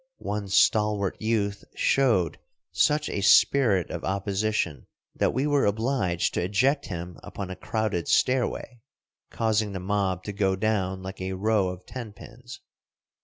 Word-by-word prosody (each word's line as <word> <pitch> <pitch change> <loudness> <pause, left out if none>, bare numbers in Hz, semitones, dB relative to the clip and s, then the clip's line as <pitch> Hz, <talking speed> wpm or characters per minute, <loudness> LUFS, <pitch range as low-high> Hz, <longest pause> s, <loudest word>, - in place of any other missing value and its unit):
One 105 -1 -4
stalwart 105 0 +2
youth 105 -3 -1
showed 115 - +2 0.3
such 150 0 +2
a 100 - -3
spirit 105 - +4
of - - -5
opposition 100 -5 -1 0.3
that - - +1
we 135 - -1
were 145 -4 +2
obliged 105 -5 0
to - - -1
eject 130 +10 +1
him 90 -2 -6
upon 95 -2 -7
a - - -5
crowded 105 -2 -2
stairway, 125 -1 0 0.5
causing 110 -2 0
the 95 - -4
mob 95 -1 -1
to 105 - -5
go 95 -2 +1
down 95 -2 -1
like 95 0 -7
a 95 0 -3
row 105 0 +1
of 90 0 -7
tenpins. 120 0 -10
100 Hz, 140 wpm, -26 LUFS, 95-115 Hz, 0.5 s, spirit